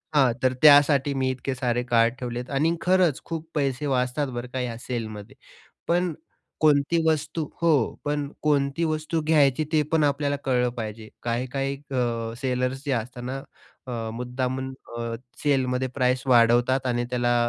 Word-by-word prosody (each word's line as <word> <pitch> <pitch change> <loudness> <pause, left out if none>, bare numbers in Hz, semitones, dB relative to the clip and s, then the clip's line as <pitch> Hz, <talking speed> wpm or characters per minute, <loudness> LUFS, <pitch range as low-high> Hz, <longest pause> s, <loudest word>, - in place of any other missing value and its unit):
हां. 130 -4 +5
तर 130 0 +3
त्यासाठी 145 -1 +6
मी 130 -1 0
इतके 130 +1 -4
सारे 125 -1 0
कार्ड 120 -1 +3
ठेवले 120 -1 -4
आहेत 125 - -7
आणि 165 +2 +2
खरंच 180 -5 +2
खूप 165 -1 -5
पैसे 140 0 0
वाचतात 130 +2 0
बरं 120 -1 -5
का 130 - -2
या 120 -2 -3
सेलमध्ये. 115 0 -5 0.5
पण 175 -1 +1 0.5
कोणती 150 +1 +3
वस्तू 155 0 0 0.2
हो, 170 - +4 0.3
पण 145 -1 -1
कोणती 145 +1 +1
वस्तू 155 +1 -1
घ्यायची 150 -2 +4
ते 155 -1 +4
पण 155 -2 +4
आपल्याला 145 0 +1
कळलं 125 -2 +2
पाहिजे. 110 -1 -6 0.2
काही-काही 130 +3 -1 0.2
अ, 115 -3 -1
सेलर्स 130 +1 -1
जे 140 - 0
असतात 120 +1 -3
ना 130 +2 -3 0.5
अ, 115 -3 -4
मुद्दामून 130 +2 -3 0.3
अ, 115 0 -3 0.3
सेलमध्ये 130 -3 +1
प्राईज 125 -1 +1
वाढवतात 120 +2 +4
आणि 120 -1 0
त्याला 120 -1 +1
130 Hz, 155 wpm, -25 LUFS, 120-145 Hz, 0.5 s, त्यासाठी